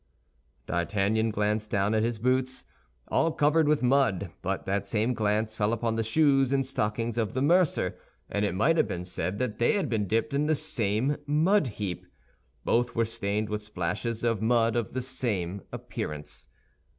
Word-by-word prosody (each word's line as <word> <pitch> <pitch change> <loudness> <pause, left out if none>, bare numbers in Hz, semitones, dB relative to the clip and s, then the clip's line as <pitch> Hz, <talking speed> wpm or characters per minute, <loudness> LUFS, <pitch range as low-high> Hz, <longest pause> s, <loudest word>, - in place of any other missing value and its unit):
D'Artagnan 100 +5 0
glanced 105 0 -1
down 100 +1 +1
at 110 - +2
his 115 0 0
boots, 130 +3 0 0.4
all 165 - +2
covered 150 +1 +3
with 150 -3 +2
mud; 120 -9 +2
but 95 +1 -2
that 100 +1 -1
same 115 +3 0
glance 110 0 0
fell 105 -1 +1
upon 115 0 -1
the 115 - 0
shoes 135 +2 +3
and 135 -1 +2
stockings 115 -2 -1
of 110 0 -1
the 130 - 0
mercer, 165 - +2 0.3
and 105 - -1
it 100 -3 0
might 165 - +3
have - - +3
been 90 0 -4
said 90 +1 -2
they 120 -1 +1
had 190 -9 0
been 110 -3 0
dipped 115 +8 0
in 145 +2 +1
the 155 - +3
same 130 -2 -1
mud 160 +4 +3
heap. 95 -5 -4 0.6
Both 120 +1 +1
were 115 - +2
stained 105 -1 -2
with 105 0 -2
splashes 105 +3 -3
of 115 -3 +1
mud 115 0 +2
of 120 -4 -2
the 130 0 -2
same 105 -8 -3
appearance. 75 -1 -6
115 Hz, 175 wpm, -28 LUFS, 105-130 Hz, 0.6 s, covered